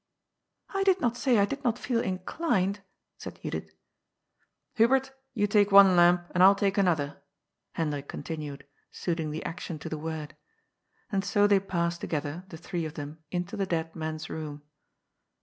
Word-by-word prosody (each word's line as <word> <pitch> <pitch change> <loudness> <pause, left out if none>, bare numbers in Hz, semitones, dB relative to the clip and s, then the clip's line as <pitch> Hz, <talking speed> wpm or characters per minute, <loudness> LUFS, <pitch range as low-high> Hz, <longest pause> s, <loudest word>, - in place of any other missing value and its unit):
*^ - - -14
I 390 - +1
did 385 -1 +4
not 240 -7 +1
say 245 -1 +2
I 200 - +5
did 280 +6 -5
not 240 -2 +1
feel 245 -2 0
inclined," 195 - -1 0.4
said - - -8
Judith. - - -4 1.0
"Hubert, 260 +3 +3 0.2
you 205 -2 +2
take 205 0 +3
one 195 -2 +8
lamp, 175 0 +5
and 180 - +2
I'll 195 +2 +8
take 195 0 +1
another,'* 155 -7 +1 0.5
Hendrik 145 -3 -2
continued, 150 -4 -6 0.2
suiting 165 -3 -3
the 155 +1 -5
action 165 0 -5
to - - -7
the 155 - -4
word. 160 -1 -5 0.8
And 195 -2 0
80 205 0 +3
they 205 -1 +5
passed 170 -3 -2
together, 155 +3 -3
the 165 - -8
three 170 0 -4
of 155 0 -6
them, 150 +1 -7
into 180 +2 -3
the 195 -1 -1
dead 165 -2 -2
man's 155 -1 -4
room. 150 -2 -6
180 Hz, 165 wpm, -28 LUFS, 160-205 Hz, 1.0 s, one